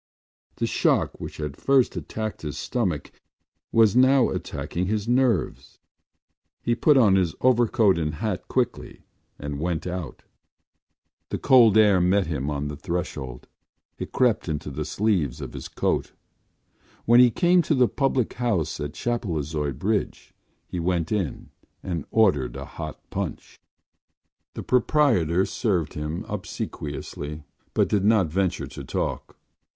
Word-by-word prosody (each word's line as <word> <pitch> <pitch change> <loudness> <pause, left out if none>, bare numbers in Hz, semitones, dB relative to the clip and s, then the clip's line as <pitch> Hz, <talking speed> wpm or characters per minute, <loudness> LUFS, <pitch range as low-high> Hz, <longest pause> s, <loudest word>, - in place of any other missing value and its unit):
The - - -1
shock - - +1
which - - -7
had 75 -2 -4
first 135 - +2
attacked 110 -1 -5
his 75 -2 -5
stomach 90 - -2 0.6
was 110 -2 +4
now 130 0 +5
attacking 90 +1 -3
his 105 +1 -1
nerves. 120 - 0 0.9
He 120 - +1
put 145 +4 +4
on 105 -7 +5
his 90 -5 0
overcoat 115 -6 +3
and 75 -1 -2
hat 95 +1 -3
quickly 125 -2 -2 0.3
and 70 0 -5
went 85 0 -2
out. 90 -2 -5 1.1
The - - -2
cold 120 -6 +6
air 105 -4 +5
met 95 +2 +3
him 75 -3 -3
on 75 0 -2
the 75 - -5
threshold; 70 -5 -5 0.5
it - - -5
crept 120 -8 +1
into 75 -1 -3
the 75 +2 -4
sleeves 95 - 0
of - - -7
his - - -7
coat. - - -1 0.9
When 120 +1 +6
he 125 -1 +8
came 175 +7 +3
to 155 -1 0
the 125 -2 +4
public 135 -3 0
house 100 -13 -1
at 75 0 -5
Chapelizod 80 - -2
Bridge 105 +1 -2 0.3
he 90 - -5
went 85 -1 -1
in 95 -9 -3 0.3
and 85 -6 -3
ordered 95 - +2
a - - -6
hot - - -7
punch. - - -5 1.0
The - - -5
proprietor 115 - +2
served 90 -9 -1
him 75 +2 -4
obsequiously 75 +1 -6 0.3
but - - +3
did 100 -2 +1
not 105 -5 +3
venture 90 -4 0
to 70 +1 -9
talk. - - -4
95 Hz, 140 wpm, -25 LUFS, 75-115 Hz, 1.1 s, he